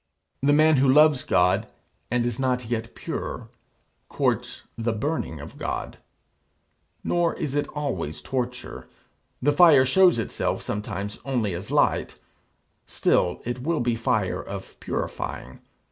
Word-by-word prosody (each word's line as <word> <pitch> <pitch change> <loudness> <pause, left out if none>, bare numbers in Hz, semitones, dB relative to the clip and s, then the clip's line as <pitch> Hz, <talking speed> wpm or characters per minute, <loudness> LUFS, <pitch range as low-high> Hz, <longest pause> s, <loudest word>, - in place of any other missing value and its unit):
The 140 +2 +3
man 155 +1 +5
who 130 0 +4
loves 150 -1 +6
God, 90 +1 +2 0.4
and 120 0 +1
is 120 0 -2
not 125 -2 0
yet 115 0 -4
pure, - - -5 0.6
courts - - -1
the 115 0 -1
burning 115 - -3
of - - -10
God. - - -4 1.0
Nor 175 -1 +1
is 140 - -3
it 145 0 0
always 95 - -3
torture. 125 -1 -4 0.6
The 145 - +4
fire 145 -4 +7
shows 180 +5 +5
itself 115 - -2
sometimes 105 -1 -4
only 120 -8 -1
as 90 +4 -6
light - - +1 0.7
still 90 -1 +1
it 120 +1 -3
will 160 +3 0
be 120 -1 +1
fire 115 - 0
of - - -9
purifying. 65 - -5
125 Hz, 130 wpm, -25 LUFS, 110-145 Hz, 1.0 s, fire